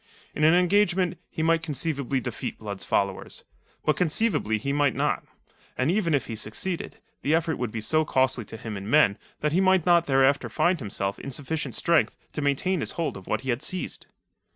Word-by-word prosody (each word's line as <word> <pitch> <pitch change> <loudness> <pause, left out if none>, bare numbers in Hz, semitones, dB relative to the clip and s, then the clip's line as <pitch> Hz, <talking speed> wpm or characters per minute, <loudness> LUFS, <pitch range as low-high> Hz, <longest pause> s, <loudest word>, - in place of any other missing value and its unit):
In 150 - -2
an 160 +2 +6
engagement, 180 -1 +2
he 160 - -3
might 165 0 +3
conceivably 140 -4 -2
defeat 125 -4 -5
Blood's 100 -3 -6
followers. 100 -1 -1 0.4
But 155 -2 +2
conceivably 160 - +1
he 140 +6 -2
might 145 -3 +2
not. - - 0 0.5
And 130 +5 +2
even 175 -6 +2
if 140 - 0
he 115 - -5
succeeded, 110 - -4 0.2
the 150 +3 +2
effort 165 -1 0
would 125 -3 -2
be 115 - -4
so 155 +8 +2
costly 130 -5 +1
to 115 - -9
him 110 -1 -6
in 100 +2 -6
men 115 -8 +4 0.2
that 150 - +1
he 185 - +3
might 190 -3 +4
not 170 -1 +4
thereafter 135 0 +3
find 175 -1 +2
himself 100 -4 -3
in - - -6
sufficient 150 +3 -4
strength 170 -2 +2 0.2
to 150 - -3
maintain 145 +6 +1
his - - -3
hold 165 -3 -2
of 95 -2 -10
what - - 0
he 130 - -1
had 120 +3 -2
seized. 185 +4 -5
150 Hz, 200 wpm, -26 LUFS, 125-170 Hz, 0.5 s, an